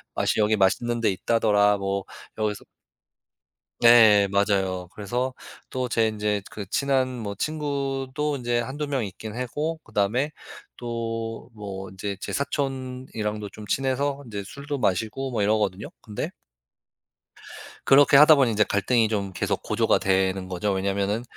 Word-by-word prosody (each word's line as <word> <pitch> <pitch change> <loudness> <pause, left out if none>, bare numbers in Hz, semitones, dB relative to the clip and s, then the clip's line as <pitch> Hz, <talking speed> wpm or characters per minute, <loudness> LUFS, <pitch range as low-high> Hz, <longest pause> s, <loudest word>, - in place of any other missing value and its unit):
맛이 - - +1
여기 105 0 +3
맛있는 120 +5 +1
데 115 - +2
있다더라. 105 0 +2
뭐 100 0 -2 0.4
여기서" 105 -1 -1 1.2
네. 110 -4 +7
맞아요. 95 -2 0
그래서 125 +6 -2 0.4
또 130 -1 -2
제 115 -1 +2
인제 105 -1 -1
그 105 -2 -6
친한 135 0 +1
뭐 105 -4 -4
친구도 140 +1 -2
인제 120 -1 0
1-2 145 +5 -3
명 135 -5 -1
있긴 105 +3 -8
했고 150 +6 -3
그다음에 110 +8 0 0.5
또 115 -1 -3 0.2
뭐 95 -3 -7
인제 95 +1 -5
제 - - -5
사촌이랑도 130 -7 -3
좀 105 - -11
친해서 135 +3 0
인제 105 -4 -5
술도 140 +6 -5
마시고 110 +5 -1
뭐 115 - -1
이러거든요. 105 -2 0
근데 105 -2 -4 1.6
그렇게 140 0 +7
하다 155 +2 +9
보니 135 -5 +3
인제 105 0 +3
갈등이 110 +3 +2
좀 100 -3 -2
계속 - - -1
고조가 - - +2
되는 95 0 +1
거죠. 95 +3 -1
왜냐하면은 100 +3 -1
110 Hz, 285 characters per minute, -25 LUFS, 100-130 Hz, 1.6 s, 하다